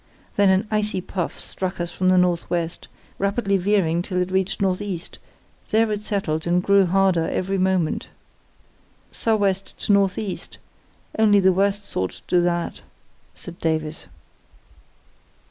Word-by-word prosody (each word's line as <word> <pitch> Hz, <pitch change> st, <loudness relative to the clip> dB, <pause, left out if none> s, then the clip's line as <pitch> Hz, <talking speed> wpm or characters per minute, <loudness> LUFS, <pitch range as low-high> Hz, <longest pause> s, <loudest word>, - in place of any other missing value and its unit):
Then 200 Hz, -1 st, +4 dB
an 190 Hz, +3 st, +2 dB
icy 210 Hz, -2 st, 0 dB
puff 180 Hz, -1 st, -4 dB
struck 185 Hz, -1 st, -4 dB
us 175 Hz, 0 st, -3 dB
from 185 Hz, +1 st, +1 dB
the 185 Hz, -, +5 dB
north 180 Hz, -2 st, +2 dB
west, 170 Hz, -1 st, -2 dB, 0.3 s
rapidly 200 Hz, 0 st, +1 dB
veering 185 Hz, -3 st, +2 dB
till 180 Hz, 0 st, -2 dB
it 180 Hz, +1 st, -1 dB
reached 190 Hz, 0 st, 0 dB
north 190 Hz, -1 st, +1 dB
east; 185 Hz, -4 st, -5 dB, 0.5 s
there 220 Hz, 0 st, +2 dB
it 210 Hz, -1 st, -2 dB
settled 170 Hz, -7 st, -2 dB
and 175 Hz, +1 st, +2 dB
grew 200 Hz, -1 st, +4 dB
harder 185 Hz, -2 st, +2 dB
every 195 Hz, +1 st, -1 dB
moment. 185 Hz, -3 st, 0 dB, 1.0 s
"'Sou' 225 Hz, -1 st, +1 dB
west 195 Hz, -2 st, -1 dB
to 205 Hz, -, +1 dB
north 195 Hz, -1 st, +3 dB
east—only 210 Hz, +1 st, -2 dB
the 190 Hz, -1 st, +4 dB
worst 200 Hz, +2 st, 0 dB
sort 95 Hz, 0 st, -3 dB
do 180 Hz, -1 st, +3 dB
that,' 175 Hz, -1 st, -1 dB, 0.5 s
said 175 Hz, -1 st, -7 dB
Davies. 155 Hz, -, -2 dB
190 Hz, 145 wpm, -23 LUFS, 175-200 Hz, 1.0 s, the